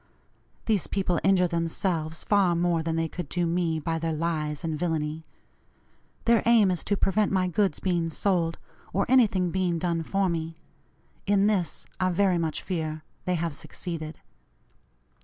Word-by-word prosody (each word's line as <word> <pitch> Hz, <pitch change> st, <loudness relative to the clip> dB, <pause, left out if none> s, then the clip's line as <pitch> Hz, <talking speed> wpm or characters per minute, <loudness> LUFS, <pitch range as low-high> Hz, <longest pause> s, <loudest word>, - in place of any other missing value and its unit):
These 210 Hz, -6 st, +1 dB
people 180 Hz, -4 st, 0 dB
injure 190 Hz, -2 st, +4 dB
themselves 165 Hz, -1 st, -1 dB
far 195 Hz, -4 st, +3 dB
more 170 Hz, -1 st, +1 dB
than 160 Hz, 0 st, -2 dB
they 165 Hz, 0 st, 0 dB
could 165 Hz, -2 st, -6 dB
do 175 Hz, -1 st, 0 dB
me, 165 Hz, -1 st, 0 dB
by 165 Hz, +2 st, -2 dB
their 165 Hz, 0 st, -1 dB
lies 155 Hz, -1 st, -2 dB
and 160 Hz, -2 st, -1 dB
villany. 160 Hz, -1 st, -2 dB, 1.0 s
Their 235 Hz, -1 st, +5 dB
aim 220 Hz, -5 st, +6 dB
is 180 Hz, -, -2 dB
to 205 Hz, -, +1 dB
prevent 205 Hz, +2 st, +2 dB
my 185 Hz, -2 st, +2 dB
goods 185 Hz, -2 st, +1 dB
being 175 Hz, -3 st, 0 dB
sold, 165 Hz, -1 st, 0 dB, 0.4 s
or 200 Hz, +2 st, +1 dB
anything 205 Hz, -9 st, +3 dB
being 180 Hz, -2 st, 0 dB
done 170 Hz, 0 st, -1 dB
for 195 Hz, +4 st, 0 dB
me. 165 Hz, -1 st, -3 dB, 0.7 s
In 200 Hz, 0 st, +4 dB
this, 190 Hz, -7 st, 0 dB
I 185 Hz, -1 st, +2 dB
very 185 Hz, -1 st, +2 dB
much 160 Hz, -2 st, -2 dB
fear, 155 Hz, -4 st, -3 dB, 0.2 s
they 180 Hz, -, +1 dB
have 165 Hz, -2 st, -2 dB
succeeded. 155 Hz, +1 st, -6 dB
175 Hz, 160 wpm, -27 LUFS, 165-190 Hz, 1.0 s, aim